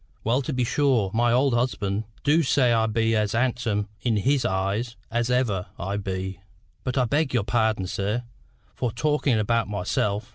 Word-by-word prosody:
"Well 120 +5 +2
to 145 - -4
be 125 -2 0
sure, 125 -6 +2
my 120 +1 +3
old 130 +2 +3
husband 110 -4 -1 0.2
du 150 +3 +4
say 130 -4 +3
I 110 -1 +2
be 115 +1 +1
as 105 -1 +1
handsome 115 -4 0
in 115 -3 +1
his 135 +5 +1
eyes 100 +5 -1 0.2
as 120 +1 0
ever 110 -7 +1
I 95 +3 -3
be. 95 -1 -4 0.4
But 125 +1 -2
I 125 - +3
beg 140 +2 0
your 115 - +2
pardon, 110 -3 +1
sir, 100 +6 -2 0.5
for 125 -3 -2
talkin' 140 +1 +1
about 115 +2 +1
myself. 105 +2 -1
115 Hz, 175 wpm, -25 LUFS, 105-125 Hz, 0.5 s, du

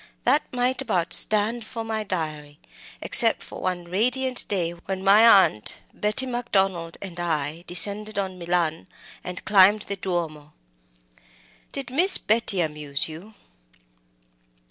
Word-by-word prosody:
that 300 - +3
might 250 +1 0
about 175 -10 -1
stand 215 +3 +2
for 225 +1 -7
my 220 -1 -4
diary, 155 -6 -5 0.5
except - - +4
for - - -10
one 180 -1 -3
radiant 250 +8 -1
day 175 -4 -2
when 190 +2 -7
my 200 0 +7
aunt, 105 0 -3 0.2
Betty 215 +5 +1
Macdonald, 195 -9 -2
and 180 -3 -8
I 160 -1 -3
descended 210 +4 +1
on 190 -2 -4
Milan, 170 -1 -2 0.4
and 180 0 -8
climbed 205 +1 +5
the 200 - -5
Duomo." 165 -6 -5 1.2
"Did 275 -3 -7
Miss 355 +8 +5
Betty 215 -4 +1
amuse 150 -3 -2
you?" 175 +8 -12
190 Hz, 125 wpm, -23 LUFS, 170-220 Hz, 1.2 s, my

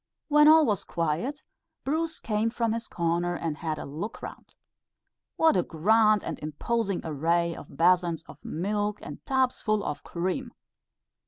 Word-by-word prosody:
When 300 0 +6
all 315 0 +8
was 205 -7 0
quiet, 170 - -2 0.4
Bruce 320 +3 -1
came 215 0 0
from 230 -1 -1
his 230 0 -4
corner 170 +1 -1
and 165 -3 -3
had 155 -2 -3
a - - -6
look 165 +10 -6
round. - - -9 0.8
What 320 0 +4
a 180 - +4
grand 215 +6 +3
and - - -5
imposing 195 +7 -2
array 165 +2 0
of - - -12
basins 170 -1 +3
of - - -15
milk 205 +5 -2
and - - -9
tubs 260 -1 +1
full 215 -2 +1
of 145 - -4
cream! 190 +9 -3
200 Hz, 155 wpm, -27 LUFS, 170-230 Hz, 0.8 s, all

